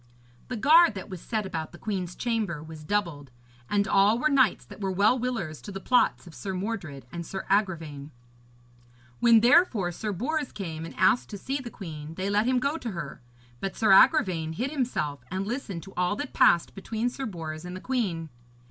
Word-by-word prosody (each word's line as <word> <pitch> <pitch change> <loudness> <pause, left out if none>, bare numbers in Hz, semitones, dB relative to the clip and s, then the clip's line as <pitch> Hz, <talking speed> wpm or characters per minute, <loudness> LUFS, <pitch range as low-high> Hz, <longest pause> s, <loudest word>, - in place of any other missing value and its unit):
The 250 - -4
guard 310 +2 +6
that 190 +1 -7
was 185 -3 -7
set 220 -3 -2
about 160 -4 -5
the - - -10
queen's 185 -3 -4
chamber 215 -10 -2
was 160 -1 -10
doubled, 165 -6 -2 0.4
and 200 -1 +1
all 200 +4 +4
were 305 +5 +2
knights 260 -7 +3
that - - -12
were 195 - -1
well 205 +7 +3
willers 220 - -3
to 205 - -8
the 195 - -5
plots 250 +1 +2
of 170 - -12
Sir 190 +3 -5
Mordred 180 - -4
and 170 0 -5
Sir 190 +3 -6
Agravaine. 165 -8 0 1.1
When, 230 -2 +6
therefore, 240 - +4
Sir 210 +5 -4
Bors 285 - -2
came 165 -5 -5
and - - -9
asked 125 0 +3
to 205 - -6
see 270 +8 -3
the 250 -3 -7
queen, 160 -6 -8
they 190 +3 -2
let 210 +3 +2
him 255 0 +3
go 280 +5 0
to 235 - -4
her; 150 -6 -6 0.4
but 195 - -4
Sir 220 -3 +3
Agravaine 185 - +5
hid 245 - -2
himself 240 - -2
and 190 +1 -2
listened 210 -7 -4
to 195 - -12
all 180 +3 +1
that 290 +4 -5
passed 170 -1 +4
between 220 +4 -3
Sir 265 +2 -4
Bors 160 -5 -6
and 180 0 -7
the - - -6
queen. 185 -10 -2
195 Hz, 200 wpm, -27 LUFS, 170-235 Hz, 1.1 s, guard